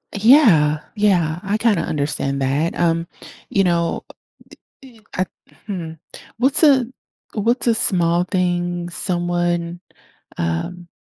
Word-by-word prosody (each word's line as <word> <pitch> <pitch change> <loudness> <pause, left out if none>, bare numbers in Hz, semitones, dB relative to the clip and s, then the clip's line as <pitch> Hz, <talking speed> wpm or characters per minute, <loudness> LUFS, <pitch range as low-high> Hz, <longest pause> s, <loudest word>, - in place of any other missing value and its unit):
Yeah. 200 - +5 0.2
Yeah. 175 -6 +1
I 200 +2 -1
kinda 220 -2 +2
understand 140 -2 -2
that. 140 +5 0
Um, 165 0 0 0.4
you 195 - +2
know, 170 -2 0
uh - - -13
uh - - -49 0.7
e 250 -4 -16 0.2
uh 185 - +1 0.4
hmm 175 -5 -5 0.5
what's 265 +6 +3
a 270 -5 +5 0.5
what's 235 +4 0
a 230 - +4
small 175 -6 +3
thing 175 -1 -1
someone, 175 -1 -1 0.6
um 85 - -3
175 Hz, 120 wpm, -20 LUFS, 165-210 Hz, 0.7 s, Yeah